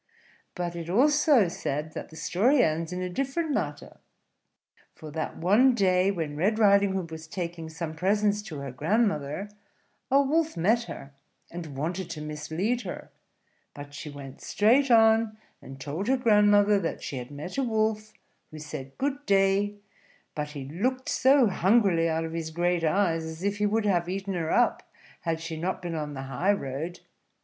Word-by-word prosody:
But 175 -1 -3
it 170 -1 -5
is - - -10
also 280 - +4
said 150 -2 -3
that - - -7
the 160 - -13
story 240 - +2
ends 160 0 -1
in 180 0 -3
a - - -2
different 275 - -2
manner; 285 - -4 1.0
for 155 -2 -10
that 155 +1 -4
one 220 +9 +4
day, 185 -3 +3
when 160 -6 -3
Red 200 +8 +1
Riding 200 -2 +4
Hood 180 -4 -3
was 160 0 -8
taking 170 -2 -5
some 160 0 -5
presents 205 +4 +1
to 185 -8 -8
her 140 -2 -5
grandmother, 160 - 0 0.6
a 275 +1 +5
Wolf 310 - +1
met 220 +8 +2
her, 140 -9 -9 0.4
and 160 -5 -7
wanted 170 +5 -3
to 160 -3 -6
mislead 160 +10 -2
her; 190 -6 -8 0.6
but 145 0 -10
she 145 +1 -7
went 140 -2 -10
straight 250 +7 +3
on, 225 -1 +4 0.2
and 135 0 -11
told 150 - -4
her 265 +1 +3
grandmother 210 -3 +4
that 165 - -4
she 135 - -5
had 125 0 -6
met 150 - -6
a - - +1
Wolf, 215 -2 0 0.4
who 155 - -10
said 145 -3 -8
good 280 +1 -2
day; 195 +1 +2 0.6
but 150 -1 -4
he 140 -3 -6
looked 250 - -2
so 265 0 +4
hungrily 190 -4 +3
out 160 0 -1
of 160 - -6
his 165 -1 -3
great 175 +1 0
eyes, 165 -1 +1
as 160 +2 -7
if 200 0 0
he 210 0 +1
would 220 +1 0
have 175 -4 +1
eaten 195 +1 -3
her 165 -3 -2
up 245 - +2 0.4
had 165 -2 -2
she 165 0 -5
not 180 +4 -2
been 175 -2 -5
on 150 -2 -4
the 135 - -5
high 135 +10 +1
road. 160 +1 -5
180 Hz, 180 wpm, -27 LUFS, 160-215 Hz, 1.0 s, a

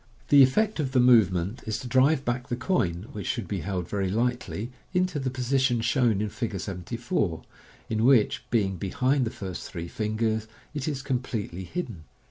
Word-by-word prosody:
The 145 -1 +8
effect 200 +11 +3
of 135 -3 -1
the 130 - +4
movement 110 -4 +4
is 110 - -1
to 130 - -6
drive 135 +3 +3
back 120 +1 -1
the 120 - -1
coin 110 - 0
(which 105 -9 -6
should 115 -7 -2
be 100 0 -2
held 90 0 -3
very 100 -2 -1
lightly) 120 +1 -1 0.2
into 180 -4 +1
the 130 -1 -1
position 130 -1 +1
shown 115 -3 +2
in 105 - -1
Fig. 110 -3 -3
74, 100 -1 -2 0.4
in 110 0 0
which, 120 -4 +4
being 95 -5 +1
behind 130 - +1
the - - -1
first 95 -5 -6
three 85 -2 -5
fingers, 110 +2 -1 0.3
it 145 -1 -3
is 140 -3 -2
com 135 -3 0
pletely 100 -8 -5
hidden. 115 - -5
115 Hz, 180 wpm, -27 LUFS, 100-130 Hz, 0.4 s, The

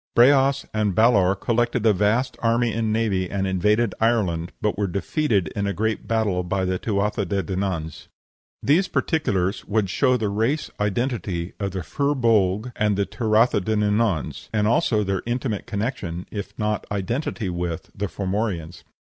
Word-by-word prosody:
Breas 135 +2 +5
and 105 -3 0
Balor 100 -4 +4
collected 120 +3 0
a 110 - +6
vast 110 +7 +1
army 115 0 +2
and 110 0 0
navy 100 -5 0
and 100 -1 -1
invaded 105 +4 +1
Ireland, 95 -7 +1
but 105 - 0
were 100 0 0
defeated 100 - 0
in 100 +3 -2
a 100 - -1
great 110 +1 -2
battle 110 -5 +1
by 95 +1 -1
the 90 0 -1
Tuatha 105 0 0
de 95 +1 -1
Dananns. 90 -3 -3 0.6
These 170 +7 +3
particulars 100 - 0
would 105 -3 0
show 125 +1 +3
the 110 -3 -1
race 115 +9 -1
identity 105 -5 -2
of 100 -1 -1
the 95 -2 -5
Fir 140 - 0
Bolg 110 -2 +2
and 105 -2 +1
Tuatha 110 -1 +2
de 110 +4 -1
Dananns; 105 - 0
and 105 -1 +1
also 110 -1 +2
their 95 -1 -1
intimate 120 -3 -2
connection, 100 -6 -3
if 100 -1 -6
not 105 -1 -1
identity 105 +1 -2
with, 85 -2 -4
the 105 +1 -2
Formorians. 95 -4 -3
105 Hz, 155 wpm, -23 LUFS, 95-115 Hz, 0.6 s, a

